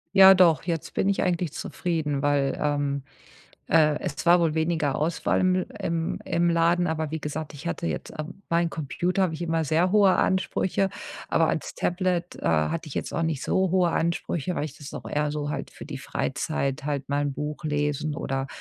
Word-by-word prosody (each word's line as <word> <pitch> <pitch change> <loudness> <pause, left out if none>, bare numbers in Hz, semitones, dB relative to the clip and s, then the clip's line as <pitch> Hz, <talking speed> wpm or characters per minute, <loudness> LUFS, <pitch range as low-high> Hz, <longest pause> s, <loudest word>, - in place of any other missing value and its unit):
Ja 190 0 +10
doch. 175 -4 +5
Jetzt 165 -3 -3
bin 195 - +1
ich 200 - +1
eigentlich 175 -3 0
zufrieden, 155 -5 -2
weil, 140 -2 +1
ähm, 145 -2 0 0.7
äh, 150 -1 +4
es 145 - -4
war 175 +1 +6
wohl 160 -2 +1
weniger 160 -3 0
Auswahl 165 +3 0
im 185 0 +3
L 185 - -1 0.2
im 165 -1 -1
im 170 0 +1
Laden, 170 +1 +3
aber 160 -2 -2
wie 160 0 -3
gesagt, 150 +1 -5
ich 145 +4 -9
hatte 170 0 -2
jetzt, - - -4
ähm 175 +6 -7
meinen 170 0 +2
Computer 175 +5 -1
habe 175 -4 +1
ich 160 - -5
immer 165 -1 0
sehr 165 +5 +2
hohe 200 -3 +6
Ansprüche. 190 0 +1 0.4
Aber - - +3
ans - - -2
Tablet, 180 -1 -1
äh, - - -11
hatte 80 - +1
ich 140 - -8
jetzt - - -3
auch - - -1
nicht 160 -4 -1
so 190 -1 +1
hohe 180 -2 +3
Ansprüche, 170 0 -1
weil 150 - -1
ich 145 -2 -7
das 145 -2 -10
auch - - -7
eher 150 0 0
so 145 -1 -3
halt - - -4
für - - -11
die - - -6
Freizeit, 140 +1 -2
halt 145 -2 -2
mal 145 +1 +1
'n 145 -1 -1
Buch 150 0 -5
lesen 150 0 -1
oder 135 -1 -2
160 Hz, 205 wpm, -26 LUFS, 145-175 Hz, 0.7 s, Ja